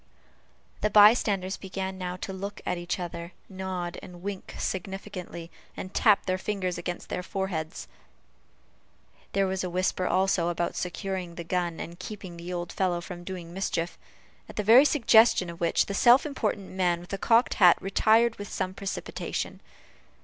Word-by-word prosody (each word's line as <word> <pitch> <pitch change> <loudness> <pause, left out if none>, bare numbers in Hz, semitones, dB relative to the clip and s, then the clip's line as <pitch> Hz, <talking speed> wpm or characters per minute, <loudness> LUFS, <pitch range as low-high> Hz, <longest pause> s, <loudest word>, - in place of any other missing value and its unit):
The 210 - +2
by 210 +1 +9
standers 195 -5 -1
began 190 0 -5
now 180 -1 -3
to 190 - -4
look 200 +2 -6
at 180 - -1
each 175 +2 -3
other, 170 0 -6
nod, 185 -2 -4
wink 185 +1 -7
significantly, 190 -3 -5 0.3
and 185 - -6
tap 210 -3 +4
their 185 0 0
fingers 190 -3 -2
against 175 - -5
their 180 - -2
foreheads. 180 -4 -4 1.5
There 195 0 +3
was 190 0 -2
a 180 - -2
whisper, 185 +1 0
also, 185 -2 +2
about 170 0 -2
securing 180 -1 -4
the 170 - -5
gun, 175 -1 -1
and 170 +1 -7
keeping 195 -5 -7
the 170 +1 -7
old 175 -1 -4
fellow 180 -2 0
from 175 0 -8
doing 175 -2 -7
mischief; 175 -3 -2 0.5
at - - -10
the 210 - -1
very 235 +7 +8
suggestion 225 - +5
of 170 - -12
which, 170 - +2
the 200 - -4
self 240 +7 +6
important 215 -8 -2
man 180 -2 +1
with 175 - -13
the 195 - -4
cocked 235 +4 +4
hat 180 -2 +8
retired 220 +4 +3
with 205 - -7
some 185 - -2
precipitation. 195 0 -4
185 Hz, 165 wpm, -27 LUFS, 175-200 Hz, 1.5 s, by